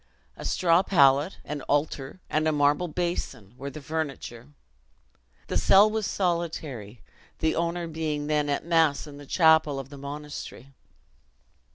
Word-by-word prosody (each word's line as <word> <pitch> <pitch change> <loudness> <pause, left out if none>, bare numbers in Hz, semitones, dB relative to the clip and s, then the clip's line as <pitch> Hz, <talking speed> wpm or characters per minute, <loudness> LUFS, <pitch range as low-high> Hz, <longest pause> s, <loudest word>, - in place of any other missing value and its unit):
A - - -9
straw 170 -1 +3
pallet, 145 -3 +3
an 150 -1 -5
altar, 145 +2 -1
and 155 +1 0
a - - +3
marble 145 +3 +2
basin, 155 - -4
were 140 +2 -6
the 140 +1 -10
furniture. 140 -5 -5 1.0
The - - -2
cell 205 +2 +6
was 220 -2 -1
solitary 160 - -3 0.4
the 160 - +1
owner 170 +1 -1
being 155 -2 -3
then 150 -1 0
at 140 - -1
mass 165 -4 +2
in 145 -2 -11
the 145 - -12
chapel 160 -4 +4
of 135 -1 -6
the 140 -1 -11
monastery. 140 -2 -8
150 Hz, 145 wpm, -26 LUFS, 140-170 Hz, 1.0 s, cell